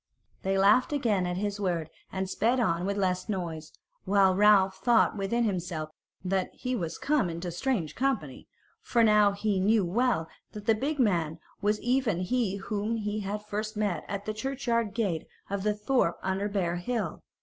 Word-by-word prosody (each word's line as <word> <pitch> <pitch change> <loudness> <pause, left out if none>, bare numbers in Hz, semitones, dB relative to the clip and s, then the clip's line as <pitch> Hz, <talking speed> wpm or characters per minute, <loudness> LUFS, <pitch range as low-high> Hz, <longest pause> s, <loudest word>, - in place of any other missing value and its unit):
They 195 0 0
laughed 205 +8 +4
again 220 -11 +1
at 180 0 -2
his 205 +1 -2
word 175 -5 -1 0.2
and 190 0 -2
sped 230 +7 +1
on 175 -5 +1
with 200 0 -1
less 185 +1 0
noise; 165 -6 -4 0.3
while 195 -1 +4
Ralph 195 -1 +5
thought 235 -3 +3
within 210 +4 0
himself 175 -6 -2 0.3
that 185 0 0
he 255 0 -2
was 170 -7 -3
come 280 -10 +1
into 170 +1 -4
strange 175 - -1
company, 270 +1 -2 0.3
for 235 -2 +2
now 210 -2 +5
he 200 -1 0
knew 205 +1 +3
well 215 -2 +1 0.3
that 210 -1 -8
the 225 - +5
big 280 +8 -2
man 170 - +1 0.2
was 210 +1 +1
even 245 -7 +1
he 210 0 0
whom 210 +3 -2
he 210 -1 -2
had 210 +1 -4
first 210 +1 -4
met 205 -5 -1
at 200 0 -4
the 215 - -2
churchyard 235 -3 -1
gate 185 -9 -1 0.2
of 200 -1 -1
the 210 +1 +1
thorp 210 -5 +1
under 190 +2 -1
Bear 180 -4 -1
Hill. 205 -2 -3
205 Hz, 175 wpm, -28 LUFS, 185-225 Hz, 0.3 s, Ralph